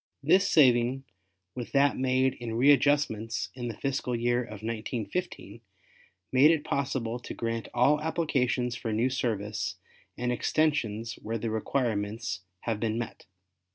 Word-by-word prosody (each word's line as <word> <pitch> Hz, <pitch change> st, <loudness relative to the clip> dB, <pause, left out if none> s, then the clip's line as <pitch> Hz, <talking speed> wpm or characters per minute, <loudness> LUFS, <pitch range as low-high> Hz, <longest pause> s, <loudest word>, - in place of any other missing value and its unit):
This 185 Hz, +7 st, +4 dB
saving 130 Hz, -2 st, +4 dB, 0.5 s
with 125 Hz, -2 st, -7 dB
that 140 Hz, 0 st, +4 dB
made 130 Hz, 0 st, +2 dB
in 115 Hz, -2 st, -6 dB
readjustments 135 Hz, -4 st, +2 dB
in 120 Hz, -2 st, -5 dB
the 115 Hz, -, -5 dB
fiscal 130 Hz, -3 st, -2 dB
year 120 Hz, +1 st, +1 dB
of 110 Hz, -3 st, -10 dB
1915, 115 Hz, -, -4 dB, 0.7 s
made 135 Hz, +4 st, +6 dB
it 160 Hz, -2 st, +2 dB
possible 130 Hz, -4 st, -2 dB
to 120 Hz, -, -8 dB
grant 115 Hz, -1 st, -3 dB
all 145 Hz, +5 st, +3 dB
applications 130 Hz, -7 st, 0 dB
for 115 Hz, -1 st, -4 dB
new 115 Hz, +4 st, +1 dB
service 110 Hz, -5 st, -2 dB, 0.4 s
and 125 Hz, 0 st, -1 dB
extensions 120 Hz, -5 st, 0 dB
where 115 Hz, +1 st, -3 dB
the 115 Hz, 0 st, -3 dB
requirements 110 Hz, -3 st, -1 dB, 0.2 s
have 115 Hz, -3 st, -2 dB
been 110 Hz, 0 st, -1 dB
met. 120 Hz, -1 st, -6 dB
120 Hz, 135 wpm, -28 LUFS, 115-140 Hz, 0.7 s, made